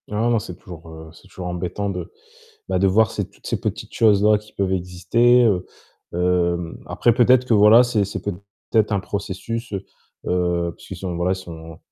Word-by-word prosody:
Non, 110 +3 0
non, 115 -2 +2
c'est 90 -4 -8
toujours, 85 -3 -12
heu, 80 0 -11
c'est 95 - -18
toujours 90 -1 -7
embêtant 90 +3 -3
de, - - -5 0.6
bah, - - 0
de 100 - +3
voir 105 +2 +3
ces - - -4
toutes - - -18
ces - - -1
petites - - -5
choses-là 105 -1 +4
qui 105 +1 -18
peuvent 95 -1 -1
exister, 95 +7 +3
heu, 95 -5 +2 0.5
hem, 85 -1 0
après 120 - +2
peut-être 125 +1 +4
que 120 - +3
voilà, 105 +3 +7
c'est 120 -4 +1
c'est 100 - -5
peut-être 100 +2 -2
un 100 - +1
processus, 100 +4 -5
heu, 100 -1 -4 0.4
heu, 90 -1 0
puisqu'ils 95 - -10
sont, 90 -1 -5
voilà, 90 +2 +1
ils - - +1
sont 80 -3 -10
95 Hz, 190 wpm, -21 LUFS, 90-110 Hz, 0.6 s, voilà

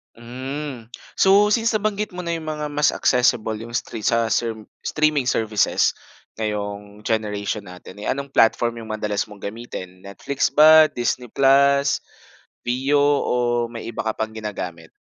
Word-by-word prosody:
Hmm. 125 0 -7 0.2
So, 200 +2 +5
since 230 +1 +2
nabanggit 210 -2 -1
mo 180 - -5
na 170 -1 -2
yung 160 - -9
mga 150 -1 -3
mas 150 0 +2
accessible, 115 -3 +2
yung 115 +1 -9
stre 115 - -3
sa 115 -1 +2
serm 110 -2 -2 0.2
streaming 150 -3 +1
services 110 -4 +1 0.4
ngayong 105 -1 -4
generation 105 -2 -2
natin, 90 +2 -12
eh 105 - -8
anong 140 0 -2
platform 115 -1 +2
yung 110 -1 -6
madalas 105 -1 -2
mong 105 -2 -14
gamitin, 100 -4 -8
Netflix 130 +8 -2
ba, 155 +1 +8
Disney 125 -3 -3
Plus, 140 +1 +4 0.6
Viu 135 +4 +1
o 125 -4 +1
may 115 -1 -7
iba 110 - -5
ka 110 - 0
pang 110 0 -3
ginagamit? 95 -7 -6
120 Hz, 150 wpm, -22 LUFS, 110-145 Hz, 0.6 s, ba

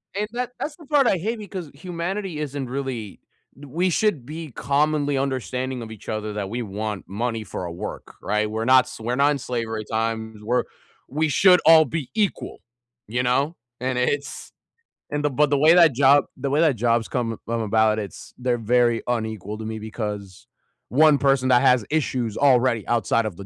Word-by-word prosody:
And 210 +1 -1
that 245 0 -3
that's 295 - -4
the 320 -2 -15
part 285 -3 +3
I 190 - +3
hate 220 +6 -3
because 185 -7 -7
humanity 175 +2 -4
isn't 140 -3 -4
really 130 -6 -5 0.4
we 150 +7 -2
should 175 - 0
be 155 +2 -7
commonly 145 +3 0
understanding 130 -1 -2
of 110 -1 -8
each 110 - -12
other 110 -1 -3
that 100 -2 -4
we 120 +3 -3
want 105 -2 -5
money 115 +3 -3
for 95 - -6
our 85 - -5
work, 85 - -7
right? 105 0 0
We're 110 +1 -3
not 130 0 +6
s 125 - -10
we're 120 +3 -2
not 140 +2 +4
in 145 - 0
slavery 115 -4 -4
times. 110 -1 -3
We're 125 +3 +1 0.4
we 155 +3 0
should 180 +4 +5
all 160 -1 +8
be 145 0 -4
equal, 210 -3 -1 0.5
you 120 +3 -1
know? 140 +7 +1 0.2
And 130 0 -2
it's 140 +3 -2 0.6
and 145 0 -2
the 150 - +3
but 145 +2 +2
the 145 - +2
way 155 +4 +6
that 170 -6 +6
job 140 +2 +5
the 135 +1 -3
way 145 +3 +2
that 155 -5 +3
jobs 115 0 +1
come 115 -3 -2
come 115 0 -1
about, 110 0 +2
it's 105 -3 -7
they're 125 -1 0
very 120 0 +2
unequal 110 -3 -3
to 110 - -7
me 110 0 -5
because 105 -3 -6 0.4
1 150 +1 +5
person 135 -2 +2
that 120 -1 +5
has 125 -5 +4
issues 125 -8 -1
already 125 -5 +3
outside 115 -1 +1
of 95 - -6
the 100 - -9
125 Hz, 190 wpm, -23 LUFS, 110-150 Hz, 0.6 s, all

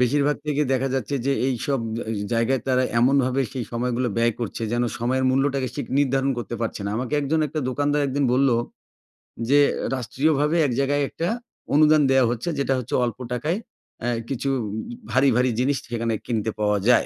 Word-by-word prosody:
বেশিরভাগ 145 +4 +2
থেকে 150 0 +1
দেখা 130 +1 +1
যাচ্ছে 135 +1 -2
যে 140 - +3 0.2
এইসব 135 +2 -1 0.3
আজ 110 -2 -2
জায়গায় 115 +2 +1
তারা 130 0 +3 0.2
এমনভাবে 130 +1 +3
সেই 125 -4 -3
সময়গুলো 125 +1 0
ব্যয় 115 0 +3
করছে, 115 0 -4
যেন 120 - +1 0.2
সময়ের 130 +3 0
মূল্যটাকে 135 -1 +1
শিক - - -4
নির্ধারণ 135 -1 +2
করতে 120 0 -5
পারছে 115 -2 -3
না। - - -1
আমাকে 130 +4 -2
একজন, 155 +3 0
একটা 155 +2 -3
দোকানদার 145 +2 +1
একদিন 140 +1 0
বললো 130 -2 +3 0.9
যে, 145 +1 +6 0.4
রাষ্ট্রীয়ভাবে 145 +5 +1
এক 130 - 0
জায়গায়, 145 +1 +1
একটা 170 - -3 0.5
অনুদান 155 0 +6
দেওয়া 135 -1 +5
হচ্ছে 120 +8 -3
যেটা 135 -1 +1
হচ্ছে, 125 - -7
অল্প 120 0 -4
টাকায় 150 +9 -1 0.4
অ্যা 120 - -1 0.2
কিছু 135 +1 -2 0.2
উম - - -5 0.4
ভারি, 135 +1 +4
ভারি 125 0 +3
জিনিস 135 +2 +2
সেখানে 115 -1 -1
কিনতে 110 -2 -1
পাওয়া 105 -1 +2
যায়। 125 - +5
130 Hz, 175 wpm, -23 LUFS, 120-140 Hz, 0.9 s, যে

